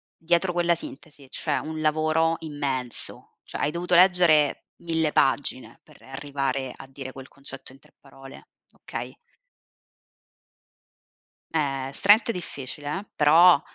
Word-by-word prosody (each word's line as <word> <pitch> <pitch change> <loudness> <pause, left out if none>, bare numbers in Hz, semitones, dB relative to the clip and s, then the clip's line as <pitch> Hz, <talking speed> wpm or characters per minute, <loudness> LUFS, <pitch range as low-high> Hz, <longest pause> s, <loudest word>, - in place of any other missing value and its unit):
dietro 175 +2 +1
quella 175 0 +2
sintesi 165 - -11
c'è 150 +2 -1
un 155 0 -5
lavoro 155 +1 +2
immenso, 140 -5 -4
cioè - - -7
hai 150 - +1
dovuto 175 +1 0
leggere 175 -5 +4 0.2
1000 160 -2 0
pagine 135 -1 0
per - - -20
arrivare 135 -1 -3
a 135 - -11
dire 135 -1 -8
quel 135 0 -11
concetto 140 -1 -11
in 135 - -17
3 - - -25
parole, 135 -1 -14 0.2
okay? - - -8 2.4
Eh, 135 -4 -1
stret 210 - +4
difficile 145 - -5
eh, 205 - -11
però 165 +4 +6
150 Hz, 120 wpm, -25 LUFS, 135-170 Hz, 2.4 s, però